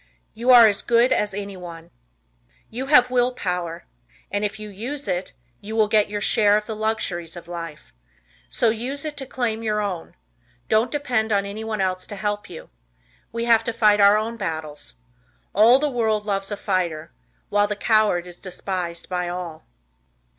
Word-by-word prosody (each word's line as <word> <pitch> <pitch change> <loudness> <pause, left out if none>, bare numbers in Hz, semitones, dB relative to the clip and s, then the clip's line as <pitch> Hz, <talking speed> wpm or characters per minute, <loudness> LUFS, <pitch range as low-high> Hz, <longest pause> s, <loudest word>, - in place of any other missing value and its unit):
You 235 +3 -3
Are 245 -2 +10
as 205 -2 0
Good 240 +2 +3
as 210 0 0
Anyone. 180 -5 -8 0.8
You 255 +4 -4
have 250 -4 +5
will 250 0 +2
power, 180 -6 -3 0.5
and 205 +1 -1
if 210 +1 -1
you 215 - -7
use 245 +9 -6
it, 180 0 -2 0.3
you 215 +2 -7
will 215 -1 +4
get 210 -1 +3
your 205 0 -3
share 205 0 +4
of 210 - -3
the 220 - -5
luxuries 190 -6 -2
of 175 - -10
life. 165 -3 -8 0.6
So 220 - +2
use 260 +6 -4
it 300 -1 -4
to 270 - -5
claim 230 -4 -2
your 215 -2 0
own. 195 -5 -4 0.5
Don't 220 +3 +3
depend 240 -6 -1
on 200 -1 +2
anyone 215 +1 -4
else 185 -1 -1
to 205 - -6
help 205 0 -3
you. 165 - -11 0.6
We 230 0 -2
have 230 -1 +4
to 235 - -2
fight 210 -2 +4
our 200 +1 +7
own 225 +2 -3
battles. 155 - -5 0.6
All 225 +5 +7
the 300 +2 0
world 220 -5 0
loves 195 -2 -1
a 205 - -4
fighter, 180 -7 -2 0.4
while 205 0 +3
the 210 - -2
coward 215 -5 +2
is 175 -1 -12
despised 180 -2 -4
by 180 -1 -2
all. 175 -3 -6
210 Hz, 175 wpm, -23 LUFS, 185-225 Hz, 0.8 s, Are